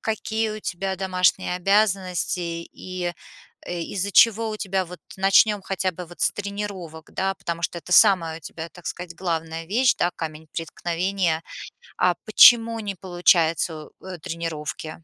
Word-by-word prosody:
какие 220 0 -2
у 215 - -5
тебя 190 0 -3
домашние 185 -1 +1
обязанности 190 -2 +1 0.3
и, 185 -1 -5 0.5
э, 175 -1 -4
из-за 200 +4 -3
чего 225 +1 +5
у 215 - -4
тебя 190 -2 -1
вот, 180 0 -11 0.2
начнем 195 +2 +4
хотя 190 -1 -1
бы 180 +1 -8
вот 175 - -13
с - - +4
тренировок, 200 -6 -6
да, 195 0 -1
потому 170 -2 -5
что 170 +2 -2
это 180 - -7
самая 170 -5 +5
у - - -21
тебя, 160 +1 -8
так 180 - -14
сказать, 175 -1 -6
главная 165 -2 -3
вещь, 245 +7 +3
да, 175 - +1
камень 160 0 -6
преткновения. 170 0 -2 0.6
А 180 -1 +3
почему 230 +1 +7
не 205 -3 -4
получается 170 -3 +1
у, - - -17
э, 185 -2 -7
тренировки? 160 -1 -6
180 Hz, 155 wpm, -24 LUFS, 165-200 Hz, 0.6 s, почему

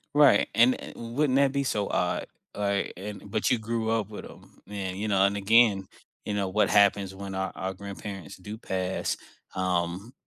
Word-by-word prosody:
Right, 145 -1 +6
and, 120 +3 +6
eh, - - -9
wouldn't 130 +4 0
that 140 -1 +4
be 140 0 0
so 105 -6 -1
odd, - - 0 0.3
like, 100 -1 -1
and 100 +1 -8
but 110 +4 0
you 125 - +3
grew 110 0 -2
up 110 -3 0
with 105 - -8
'em. - - -15
Man, 95 -2 -4
you 105 +3 -3
know, 100 -2 +3
and 100 +1 +1
again, 100 -2 +4 0.4
you 105 - -2
know, 100 -1 0
what 105 +3 +2
happens 100 -1 +4
when 100 0 -7
our 95 0 -2
our 95 0 -3
grandparents 100 -3 -8
do 105 +4 -8
pass, 95 -4 -2 0.4
um, 90 +4 -1
100 Hz, 185 wpm, -27 LUFS, 95-115 Hz, 0.4 s, Right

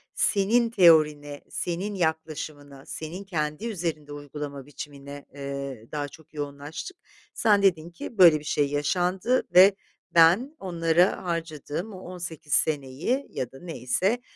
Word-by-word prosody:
senin 230 +4 +3
teorine, 150 -7 +4
senin 185 +4 -3
yaklaşımına, 155 -4 -3
senin 165 +5 -6
kendi 155 +1 -3
üzerinde 165 -8 -4
uygulama 145 -1 -7
biçimine, 140 -1 -9
eee, 140 -4 -6
daha 145 -1 -3
çok 160 +2 -17
yoğunlaştık. 145 - -6 0.4
Sen 210 -3 +3
dedin 170 -4 +2
ki 175 +6 -9
"Böyle 170 -5 +8
bir 150 - -14
şey 145 -1 +1
yaşandı 180 - +1
ve 190 +2 +8 0.4
ben 180 - +5
onlara 170 -1 +1
harcadığım 165 +2 -4
o 185 - -9
18 175 -5 -7
seneyi 155 - 0
ya 125 - -4
da 135 - -13
neyse 175 - -1
160 Hz, 125 wpm, -26 LUFS, 145-185 Hz, 0.4 s, Böyle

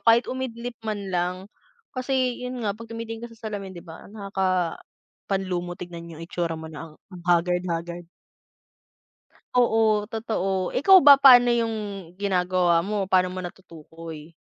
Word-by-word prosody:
kahit 230 +1 +5
umidlip 245 -2 -5
man 205 -3 -4
lang. 180 +1 0 0.6
Kasi 255 -1 -1
yun 250 0 -5
nga 200 -1 0
pag 230 +1 -11
tumitingin 230 0 -6
ka - - -23
sa 225 -1 -10
salamin 195 -3 -6
di 170 - -10
ba 160 -1 -11
nakakapanlumo 185 -2 -3
tignan 170 -1 -8
yung 165 +1 -8
itsura 170 -1 -3
mo 160 - -8
na 160 +1 -9
ang - - -18 0.3
haggard-haggard. 175 -1 0 1.5
Oo 220 -3 +3
totoo, 195 -5 -2
ikaw 380 +8 +7
ba 285 - +12
paano 245 -3 +8
yung 230 -1 0 0.4
ginagawa 180 -3 +2
mo, 200 +1 -2
paano 185 -1 +3
mo 185 - -7
natutukoy? 165 -3 -9
190 Hz, 135 wpm, -25 LUFS, 175-225 Hz, 1.5 s, ba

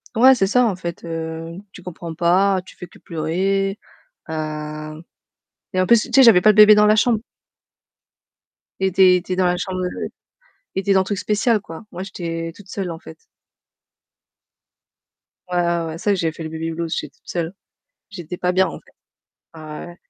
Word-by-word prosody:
Ouais, 255 +3 +7
c'est 195 - +2
ça 250 +5 +3
en 210 -5 0
fait, 170 -2 -7
heu, 165 0 -5 0.2
tu 180 - -13
comprends 170 -2 -7
pas, 185 +3 +2
tu - - -15
fais 180 - -9
que - - -19
pleurer. 195 +5 -1 0.5
Heu 155 0 -5 0.7
et 185 - +1
en 185 - +2
plus, 235 0 +5
tu - - -8
sais, 270 +2 +7
j'avais 220 -8 +7
pas 215 - +7
le - - +4
bébé 215 0 +9
dans 210 0 +5
la 215 +1 +5
chambre. 225 0 +2 1.6
Il 190 - +2
était 185 -1 +5
était 180 +1 -2
dans 185 0 +2
la 180 0 +1
chambre 185 0 -3
de 180 - -4 0.7
il - - 0
était 200 0 +1
dans 190 - +4
le - - 0
truc 200 +1 -3
spécial 215 +2 +1
quoi. 165 -2 -10
Moi, 180 +2 -6
j'étais 165 -3 -5
toute 205 -1 -16
seule 190 -2 -4
en 160 - -8
fait. 160 - -12 2.3
Ouais, 180 - -1
ouais, 170 -1 +1
ouais, 160 - -5
pour 165 - -8
ça 205 - +1
que 200 - +1
j'ai 165 -2 0
fait 165 - -9
le 160 - -5
baby 160 +1 -4
blues, 165 0 -3
j'étais 145 -2 -5
toute - - -35
seule. 170 0 -3 0.6
J'étais 180 -4 -7
pas 180 0 0
bien, 190 +1 +3
en - - -7
fait. - - -25 0.7
Ouais, 155 -1 -8
ouais, 175 - -11
180 Hz, 200 wpm, -21 LUFS, 165-195 Hz, 2.3 s, bébé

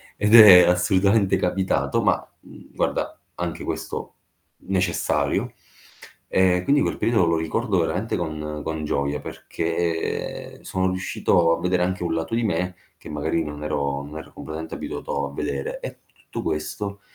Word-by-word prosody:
Ed 105 +2 +4
è 100 -5 +11
assolutamente 95 +3 +3
capitato, 95 +1 0
ma, - - +2 0.2
mhmm, - - -16
guarda, - - -1 0.2
anche 85 -2 -4
questo - - -5 0.5
necessario. 90 -3 0 0.7
E 90 -1 +3
quindi 145 +4 +3
quel - - 0
periodo 115 -6 +2
lo 85 0 +2
ricordo 95 +5 0
veramente 90 +7 -1
con 75 -2 -4
con 80 -1 -3
gioia 70 0 -1
perché 85 0 -3
sono 95 0 -1
riuscito 90 -2 +1
a - - -7
vedere 90 0 +1
anche 95 0 -1
un 85 - -1
lato 80 +4 -3
di 115 - +2
me 90 -3 -1 0.2
che - - -13
magari 80 +2 -1
non 75 -1 -7
ero 70 -2 -1
non 75 +2 -8
ero 80 - -10
completamente 80 +1 -7
abituato 70 0 -4
a 70 - -9
vedere. 70 -1 -3
E - - -7
tutto - - -8
questo 100 +6 -3
85 Hz, 150 wpm, -23 LUFS, 80-95 Hz, 0.7 s, è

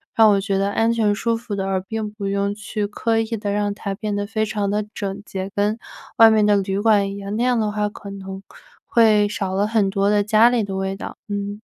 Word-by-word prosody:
让 220 -1 +6
我 200 - +3
觉 195 0 -1
得 195 +1 0
安 225 +2 +2
全 215 -3 +2
舒 230 +3 0
服 225 -2 -5
的， 195 -1 -2
而 190 -1 0
并 215 +2 -4
不 210 -1 -5
用 200 0 0
去 210 -1 -3
刻 225 +2 0
意 225 - 0
地 205 -1 -3
让 205 0 0
它 200 -1 -5
变 210 -1 -3
得 205 0 -2
非 220 +1 -1
常 210 -2 -2
得 210 +1 -1
整 200 0 -4
洁， 190 -1 -5
跟 205 +2 +1 0.4
外 225 0 +9
面 215 -1 +3
的 210 0 +4
旅 195 0 -1
馆 205 -2 +3
一 200 - -7
样， 200 +1 -5
那 230 - 0
样 250 -1 +2
的 215 -1 0
话 210 0 -1
可 205 -1 -10
能 195 -1 -8 0.4
会 215 -3 +4
少 195 -2 -3
了 195 +2 +1
很 215 -3 +2
多 195 0 +1
的 210 0 +3
家 215 +3 +5
里 245 -1 +1
的 195 -1 -4
味 190 0 -2
道， - - -8
嗯。 205 +1 -4
205 Hz, 265 characters per minute, -21 LUFS, 200-215 Hz, 0.4 s, 外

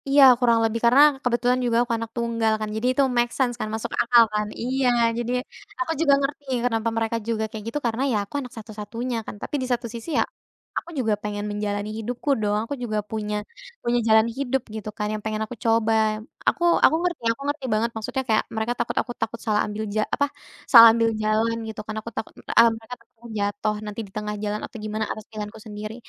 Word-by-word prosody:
Iya, 280 0 +7 0.2
kurang 235 -2 +4
lebih, 225 +1 0
karena 250 +4 +6 0.2
kebetulan 245 +1 +2
juga 230 -1 +2
aku 235 - -2
anak 225 0 -5
tunggal 230 -1 +1
kan, 215 -1 -3
jadi 220 +3 -1
itu 275 - +3
make 240 0 +3
sense 255 -3 +2
kan, - - -2
masuk 225 +1 -3
akal 235 0 +6
kan. 210 0 0
Iya, 255 +1 +1 0.3
jadi 240 0 -2 0.5
aku 340 -1 -1
juga 285 -4 +5
ngerti 285 +1 -3 0.2
kenapa 230 -2 +1
mereka 225 0 0
juga 225 -1 0
kayak 215 -1 -7
gitu, 295 - -2
karena, 230 +1 0
ya, 220 - +2
aku - - -22
anak 250 -1 -9
satu-satunya 225 +3 -5
kan. - - -7
Tapi - - -4
di 255 - -2
satu 245 0 0
sisi, 235 +5 -7
ya, - - +4 0.5
aku - - -4
juga 225 -5 +1
pengen 205 0 -3
menjalani 205 0 -2
hidupku 240 +5 -4
dong, 210 0 +1
aku 255 - -5
juga 215 -3 -2
punya 210 -1 -2 0.5
punya 240 0 +2
jalan 220 0 +6
hidup, 265 -1 0
gitu, 215 -1 -5
kan, 210 - -1
yang 215 - -4
pengen 215 0 -2
aku 220 - -8
coba. 225 -1 +3 0.6
Aku 345 - -3 0.2
aku - - +5
ngerti 345 -8 -2
aku 230 - -6
ngerti 290 -2 -2
banget, 220 +2 +1
maksudnya 225 +4 -3
kayak 220 - +3
mereka 220 +2 0
takut - - -2
aku 245 - -7
takut 230 +1 -2
salah 210 -2 +2
ambil 210 +1 -4
ja 215 - +3
apa, 285 - +2 0.5
salah 230 -2 +12
ambil 230 -1 +3
jalan, 215 +2 +1
gitu 220 - -7
kan, 215 - -5
aku 230 - -7
takut - - -5
eee, 230 - +5
mereka 225 +2 -9
takut 230 0 -28
aku 235 - -11
jatuh 205 +1 -1
nanti 210 +1 -6
di - - -19
tengah 210 0 -3
jalan 210 0 -1
atau - - -10
gimana 215 +1 -2
atas 215 - -6
pilihanku 210 0 -7
sendiri. 215 +1 -6
225 Hz, 215 wpm, -24 LUFS, 215-245 Hz, 0.6 s, salah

